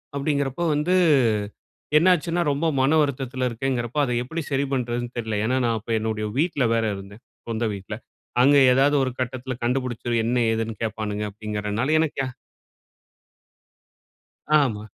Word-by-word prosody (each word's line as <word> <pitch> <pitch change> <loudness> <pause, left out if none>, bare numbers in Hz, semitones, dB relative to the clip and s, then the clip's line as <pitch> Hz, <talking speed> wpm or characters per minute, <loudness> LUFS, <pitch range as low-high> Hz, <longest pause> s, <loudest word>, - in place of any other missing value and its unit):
அப்படிங்கிறப்ப 140 +2 -1
வந்து, 160 +5 +1 1.0
என்னாச்சுன்னா, 175 0 +3
ரொம்ப 150 +4 0
மன 135 - +3
வருத்தத்தில 130 -2 -1
இருக்கேன்ங்குறப்போ 120 +2 -2
அதை 125 - -2
எப்படி 160 +6 -4
சரி 140 +1 +1
பண்றதுன்னு 120 -1 -2
தெரிலை. 110 -3 -2
ஏன்னா, 130 +3 +1
நான் 115 -1 +1
அப்போ 115 +2 -8
என்னுடைய 110 -1 -2
வீட்ல 155 -6 +1
வேற 115 0 +1
இருந்தேன். 100 +4 -11 0.3
சொந்த 115 +1 -1
வீட்ல. 100 +2 -7 0.5
அங்கு 140 +1 +6
ஏதாவது 140 +3 +3
ஒரு 130 - -1
கட்டத்தில 130 0 -3
கண்டுபுடிச்சு, 120 -1 -1
என்ன 125 +2 +1 0.2
ஏதுன்னு 115 0 -2
கேப்பானுங்க 105 -1 -3
அப்படிங்குறதுனால 105 +4 -3
எனக்கு 160 -2 -1
யா - - -2 2.4
ஆமா. 110 -5 -2
125 Hz, 130 wpm, -24 LUFS, 110-140 Hz, 2.4 s, அங்கு